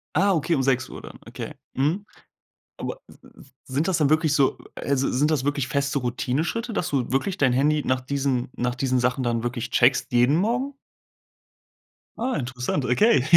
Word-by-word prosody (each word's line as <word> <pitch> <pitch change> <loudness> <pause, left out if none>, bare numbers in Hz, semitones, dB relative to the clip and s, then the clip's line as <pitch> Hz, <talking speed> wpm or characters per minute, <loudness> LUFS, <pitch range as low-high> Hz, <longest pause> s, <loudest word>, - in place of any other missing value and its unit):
Ah, 195 +4 +4
okay, 165 +2 +1
um 135 - +1
6:00 130 -1 0
dann. - - -11
Okay. - - -7 0.2
Mhm. 160 +10 0 0.7
Aber - - -5
s - - -16
w 135 - -17 0.2
sind 140 +6 -1
das 185 - +2
dann 145 -3 +3
wirklich 155 -1 +3
so 135 -2 +3 0.2
also, 140 -1 0
sind 145 +5 +2
das 140 -4 +1
wirklich 140 -3 0
feste 140 +1 0
Routineschritte, 150 - -2
dass 180 - -1
du 130 -4 -1
wirklich 175 +9 0
dein 130 -3 +3
Handy 150 +3 +2
nach 130 0 +1
diesen 135 -2 -1
nach 125 0 -1
diesen 130 0 +1
Sachen 125 +1 +1
dann 115 -1 0
wirklich 120 -1 -3
checkst 130 +2 +3
jeden 125 +4 +4
Morgen? 245 +9 0 1.4
Ah, 245 -7 -1
interessant, 125 +1 -2
okay. 135 - +4
140 Hz, 175 wpm, -24 LUFS, 125-155 Hz, 1.4 s, Ah